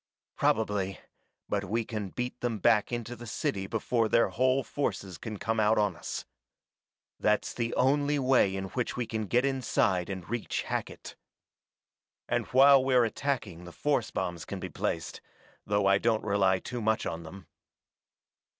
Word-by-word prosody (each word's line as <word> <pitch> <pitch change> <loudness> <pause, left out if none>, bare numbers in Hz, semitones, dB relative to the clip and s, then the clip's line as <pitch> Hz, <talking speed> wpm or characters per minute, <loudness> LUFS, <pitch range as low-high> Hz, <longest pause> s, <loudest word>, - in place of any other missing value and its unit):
"Probably, 105 -3 0 0.5
but 100 -1 -1
we 115 +4 -1
can 105 -4 -4
beat 125 +4 -4
them 120 -2 -1
back 105 +1 +3
into 120 0 -4
the 120 +1 -10
city 95 -2 -2
before 115 +1 0
their 115 - +4
whole 130 +2 +2
forces 100 - -3
can 110 -2 -6
come 115 +2 -1
out 110 +1 +3
on 105 -4 +2
us. - - -6 0.9
That's 105 0 +1
the 115 -1 -2
only 145 +3 +2
way 130 -8 +3
in 95 0 -4
which 125 +2 -3
we 125 - -1
can 110 -2 -3
get 125 +6 +2
inside 110 -9 +1
and 95 -3 -5
reach 120 0 -2
Hackett. - - -5 1.1
And - - -1
while 135 +1 +7
we're 130 -2 +4
attacking 110 -8 -3
the 85 - -9
force 120 - 0
bombs 90 -3 -3
can 95 +3 -6
be 95 - -5
placed, 80 +1 -3 0.5
though 100 -1 +1
I 100 0 +5
don't 115 -1 +1
rely 100 -2 +3
too 120 +5 -6
much 110 0 +1
on 80 - -3
them." 90 +3 -11
110 Hz, 160 wpm, -29 LUFS, 95-125 Hz, 1.1 s, while